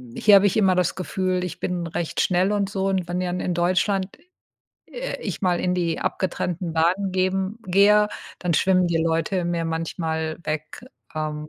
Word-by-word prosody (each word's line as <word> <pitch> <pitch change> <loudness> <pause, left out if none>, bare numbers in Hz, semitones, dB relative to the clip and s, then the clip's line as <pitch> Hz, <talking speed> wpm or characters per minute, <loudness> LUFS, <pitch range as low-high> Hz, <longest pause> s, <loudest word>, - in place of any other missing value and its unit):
hier 210 -1 +6
habe 200 +1 +6
ich 195 - 0
immer 190 -3 +4
das 180 -1 +1
Gefühl 185 0 -1
ich 180 - -7
bin 175 -2 -2
recht 165 0 -3
schnell 185 +2 +2
und 200 -2 0
so, 195 -1 -1
und 190 -2 0
wenn 175 +1 -2
dann 180 0 -2
in 180 - -1
Deutschland 185 +3 0 0.7
d - - -23
äh, - - -5
ich - - -5
mal 180 -2 +2
in 180 0 0
die 170 -3 -1
abgetrennten 180 -2 -2
Bahnen 180 +5 +1
geben 190 +3 -1
gehe, 205 +3 +5 0.3
dann 175 -2 -1
schwimmen 185 +2 +3
die 170 -1 0
Leute 165 +3 0
mir 170 -1 -1
manchmal 160 -1 -3
weg. 155 +8 -5 0.3
Ähm, 155 -1 -4
180 Hz, 185 wpm, -23 LUFS, 165-190 Hz, 0.7 s, hier